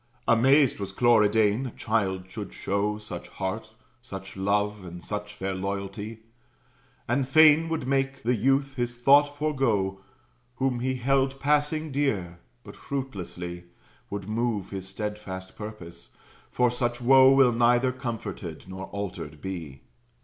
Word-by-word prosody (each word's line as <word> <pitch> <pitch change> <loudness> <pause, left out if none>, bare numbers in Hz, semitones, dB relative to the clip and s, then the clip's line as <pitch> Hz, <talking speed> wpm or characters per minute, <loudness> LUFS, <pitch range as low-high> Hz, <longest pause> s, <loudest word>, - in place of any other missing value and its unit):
Amazed 135 +3 +4
was 100 - -5
Cloridane 110 0 +3
a - - -7
child 100 -5 0
should 100 +1 -7
show 100 +2 -1
Such 100 -5 -8
heart, 95 +5 -4 0.3
such 95 -5 -9
love, 105 +1 0
and 90 -1 -9
such 105 0 -5
fair 95 -1 -3
loyalty; 100 +3 -5 0.9
And 130 +2 +1
fain 155 +2 +6
would 160 -6 -2
make 135 0 0
the 120 +2 +2
youth 135 +4 +1
his 120 0 -2
thought 145 +3 +5
forego, 115 -11 0 0.5
Whom 130 -1 0
he 130 +1 -1
held 135 +1 +1
passing 150 +2 +1
dear: 100 -12 -1 0.2
but - - -11
fruitlessly 90 -10 -5 0.4
Would 100 -1 -5
move 110 -2 -1
his 95 -1 -5
steadfast 100 -2 -6
purpose; 90 -6 -9 0.3
for 125 -1 +2
such 120 -1 -1
woe 130 +2 +7
Will 135 -2 +6
neither 120 +2 +3
comforted 115 - -6
nor 95 0 -6
altered 90 -7 -6
be. 80 -8 -6
110 Hz, 135 wpm, -27 LUFS, 95-130 Hz, 0.9 s, woe